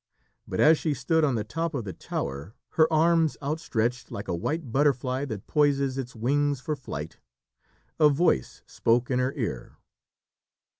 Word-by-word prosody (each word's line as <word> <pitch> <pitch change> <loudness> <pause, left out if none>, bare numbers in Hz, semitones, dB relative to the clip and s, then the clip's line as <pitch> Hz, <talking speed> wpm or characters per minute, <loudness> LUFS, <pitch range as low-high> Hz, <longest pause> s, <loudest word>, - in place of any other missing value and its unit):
But - - -4
as 155 +1 +6
she 155 -3 -1
stood 160 +6 +1
on 140 -5 +2
the 110 - -1
top 165 +8 -3
of 125 - -2
the 95 -3 -6
tower, 70 - -5
her 160 0 +3
arms 165 0 +3
outstretched, 125 -5 -2
like 100 - -6
a - - -1
white 140 - -3
butterfly 135 0 +1
that 110 -7 -6
poises 140 -3 +2
its 125 -2 -6
wings 140 +4 +1
for 150 +4 -3
flight, 80 - -7 0.8
a 150 -1 +7
voice 145 - +1
spoke 120 +3 +1
in 125 - +2
her 130 +2 0
ear. 105 - -4
135 Hz, 160 wpm, -27 LUFS, 115-150 Hz, 0.8 s, a